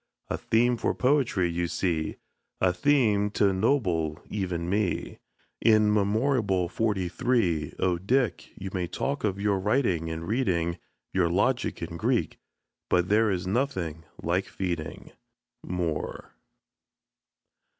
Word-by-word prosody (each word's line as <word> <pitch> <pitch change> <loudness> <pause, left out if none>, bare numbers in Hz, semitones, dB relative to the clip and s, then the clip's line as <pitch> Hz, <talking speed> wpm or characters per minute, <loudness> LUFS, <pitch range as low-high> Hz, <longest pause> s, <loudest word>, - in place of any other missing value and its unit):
A - - -1
theme 120 +2 +2
for - - 0
poetry, 125 -9 +2
you 85 +1 -1
see 85 -3 -1 0.4
A 90 -1 +3
theme 110 -5 +3
t' 105 - +1
ennoble 95 - +1
even 90 -4 -2
me, 100 0 -1 0.4
In 110 -2 +5
memorable 105 -2 +1
forty 100 -3 0
three. 90 - 0
Oh, 90 -2 +1
Dick! 120 +6 0
you 95 -1 -6
may 90 -2 -1
talk 140 +10 -3
of 100 -2 0
your 100 -1 +1
writing 95 - +1
and 80 +1 -5
reading, 90 -8 0 0.3
Your 90 -3 +2
logic 120 +4 0
and 85 0 -6
Greek, - - 0 0.5
but 90 0 +2
there 110 +1 +4
is 90 -3 -1
nothing 95 - -1 0.2
like 90 +3 +1
feeding. 85 -5 -4 0.5
MOORE. 85 -4 -3
95 Hz, 125 wpm, -27 LUFS, 85-110 Hz, 0.5 s, In